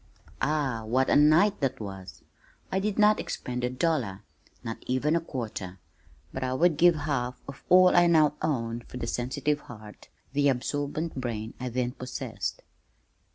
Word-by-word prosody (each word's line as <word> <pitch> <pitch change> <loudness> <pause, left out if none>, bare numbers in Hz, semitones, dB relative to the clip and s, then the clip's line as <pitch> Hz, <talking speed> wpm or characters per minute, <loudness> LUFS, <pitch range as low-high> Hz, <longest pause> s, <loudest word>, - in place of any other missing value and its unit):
Ah, 135 -6 0
what 130 +4 +1
a - - +5
night 160 +8 +5
that 135 -2 -1
was! 95 -3 -8 0.5
I 190 - +1
did 205 +1 -2
not 210 0 +5
expend 125 0 -4
a 125 - +1
dollar, 125 - -1 0.4
not 115 0 -5
even 135 +5 +1
a 170 - +1
quarter, 110 - -6 0.6
but 130 - -4
I 130 0 -1
would 165 +1 +3
give 175 +1 +6
half 135 -5 -2
of 140 - -10
all 185 0 +7
I 175 0 +6
now 155 -3 +4
own 115 -6 -1
for - - -8
the 120 - -3
sensitive 135 +5 -1
heart, 110 -5 -13 0.2
the 145 0 +3
absorbent 145 +5 -2
brain 110 -2 -4
I 125 0 -3
then 125 0 -1
possessed. 125 -1 -5
130 Hz, 160 wpm, -27 LUFS, 120-155 Hz, 0.6 s, all